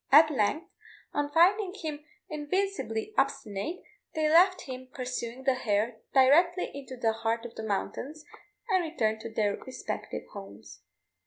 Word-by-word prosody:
At 310 +2 +8
length, 285 +6 +1 0.5
on 290 0 0
finding 370 +4 +4
him 305 -6 -5 0.2
invincibly 310 - -2
obstinate, 275 - -1 0.3
they 310 -1 +2
left 360 +4 +5
him 255 -1 -7
pursuing 250 -1 -4
the 265 - +4
hare 220 -1 0
directly 335 +7 +5
into 265 -2 -8
the 225 -2 +2
heart 230 +1 -1
of 240 - -7
the - - -6
mountains, 265 +8 -3 0.4
and 375 -5 +3
returned 220 -10 0
to 230 - -6
their 210 -2 +1
respective 260 - -5
homes. 110 - -10
270 Hz, 140 wpm, -29 LUFS, 225-320 Hz, 0.5 s, At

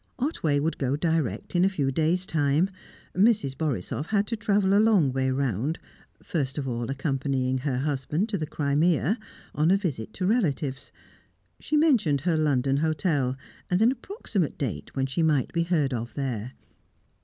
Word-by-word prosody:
Otway 205 - 0
would 160 +3 -1
go 135 0 0
direct 155 - -1
in 175 - +4
a 190 - +4
few 145 -8 -1
days' 165 +6 +1
time; 155 +4 +1 0.4
Mrs. 200 - +3
Borisoff 145 - -2
had 205 -1 +1
to 230 - -2
travel 205 -3 +2
a 205 - +6
long 195 -12 +4
way 130 0 +1
round, 130 - -1 0.5
first 140 -5 -2
of 140 -2 -2
all 120 -1 -3
accompanying 135 -2 -1
her 130 -1 -1
husband 145 - -1
to 205 - -1
the 155 - -3
Crimea, 155 - +1 0.3
on 155 +2 +2
a 195 - +5
visit 150 - -3
to 185 - -2
relatives. 155 - 0 0.7
She 305 - 0
mentioned 235 - +3
her 165 +2 +1
London 140 -3 +2
hotel, 145 -4 0 0.3
and 180 - +2
an 225 +3 +5
approximate 245 - -3
date 135 -6 -4
when 135 -1 +1
she 135 +5 -2
might 150 -5 +2
be 170 - +1
heard 155 -6 +1
of 120 0 -4
there. 125 -4 -3
150 Hz, 165 wpm, -26 LUFS, 135-185 Hz, 0.7 s, a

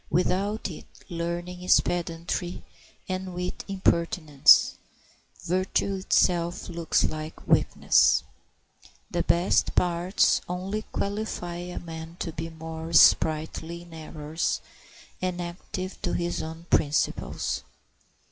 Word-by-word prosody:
Without 195 +5 +1
it 155 - -10 0.2
learning 175 +1 -4
is 180 - +5
pedantry 175 +1 -3 0.4
and 185 -1 -4
wit 180 0 -4
impertinence; 170 -6 +4 0.7
virtue 185 +2 0
itself 175 -2 +1
looks 170 -1 +1
like 155 +1 -4
weakness. - - +4 0.9
The 175 - +1
best 170 +2 +2
parts 180 +2 +2
only 190 +4 -3
qualify 200 -4 -3
a 180 +1 -6
man 165 0 -7
to 170 - -3
be 165 +1 -5
more 160 0 -7
sprightly 160 +2 +4
in 170 -1 -15
errors 155 0 -3 0.6
and 180 -1 -2
active 180 +2 -6
to 175 - -1
his 175 0 -1
own 160 +1 -7
principles. 145 0 +1
175 Hz, 105 wpm, -27 LUFS, 165-180 Hz, 0.9 s, is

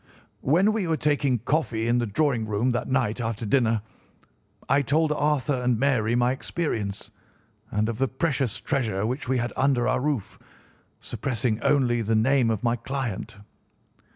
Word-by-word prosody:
"When 180 +10 +3
we 210 -5 -1
were 160 -1 +1
taking 145 -4 +1
coffee 120 -2 -1
in 120 +1 +2
the 120 - -1
drawing 115 +1 0
room 110 +4 +1
that 120 - -2
night 125 -3 0
after 115 0 -3
dinner, 115 -2 +2 0.8
I 140 +1 +3
told 150 +4 +1
Arthur 145 -3 0
and 125 -2 +1
Mary 120 -3 +1
my 120 +1 +3
experience, 110 - -3 0.6
and 105 +1 0
of 115 0 -4
the 135 - +2
precious 135 -4 -1
treasure 110 -9 -1
which 125 +2 -3
we 130 - +2
had 120 0 -2
under 130 -3 +2
our 130 0 +1
roof, 140 -7 -2 0.6
suppressing 115 -3 -2
only 120 -4 +2
the 110 0 0
name 125 +2 +3
of 110 -1 -1
my 120 0 +1
client. 120 -5 -4
125 Hz, 160 wpm, -25 LUFS, 115-140 Hz, 0.8 s, When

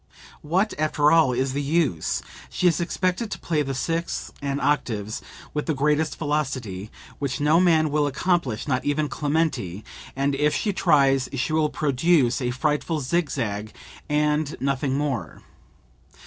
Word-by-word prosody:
What, 185 +8 +1
after 150 -1 +3
all, 165 -6 +5
is 130 +2 -1
the 140 - -1
use? 145 - 0 0.3
She - - -2
is 170 -1 +2
expected 185 +5 -1
to - - -4
play 155 -3 0
the 135 -2 -2
sixths 165 +5 -2
and 140 0 -2
octaves 115 -7 -1 0.3
with 150 - -2
the 160 - +1
greatest 150 +3 +1
velocity 130 - -2 0.3
(which 140 0 -2
no 150 +3 +4
man 160 -4 +3
will 150 0 +2
accomplish, 145 - 0
not 130 -2 0
even 145 +1 0
Clementi), 145 - -1 0.3
and 140 +1 +1
if 150 +2 +1
she 205 - 0
tries 140 -7 +3
she 135 +4 -1
will 155 -1 +2
produce 140 -3 +2
a 125 - 0
frightful 150 +5 0
zig 155 +3 0
zag, 105 -5 -3 0.3
and 150 0 +1
nothing 135 0 0
more. 140 -5 -3
145 Hz, 150 wpm, -24 LUFS, 130-155 Hz, 0.3 s, all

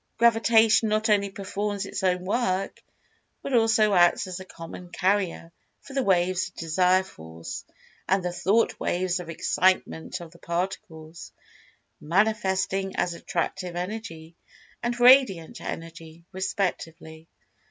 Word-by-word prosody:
Gravitation 225 -1 +4
not 215 +1 +1
only 200 -1 +2
performs 200 +1 -4
its - - -5
own 180 -1 0
work, 195 -2 -1 0.6
but 275 - -4
also 225 -3 +4
acts 175 -2 +4
as 185 0 -6
a 190 - -9
"common 175 +1 -10
carrier" 185 -3 -1 0.3
for 275 - -13
the 270 - +1
waves 185 -4 +1
of 185 - -17
Desire 180 +3 +2
Force, 80 - -9 0.5
and 190 -1 +2
the 175 - -2
Thought 195 +6 +1
waves 180 0 -1
of 175 -2 -8
Excitement 180 +1 0
of 170 -2 -10
the 170 - -18
Particles, 170 -2 -5 0.7
manifesting 195 +1 0
as 175 - 0
Attractive 175 +1 -3
Energy, 175 -4 -6 0.5
and 240 0 -2
Radiant 245 -10 +5
Energy, 165 0 -8
respectively. 180 -4 -4
185 Hz, 125 wpm, -26 LUFS, 170-210 Hz, 0.7 s, Radiant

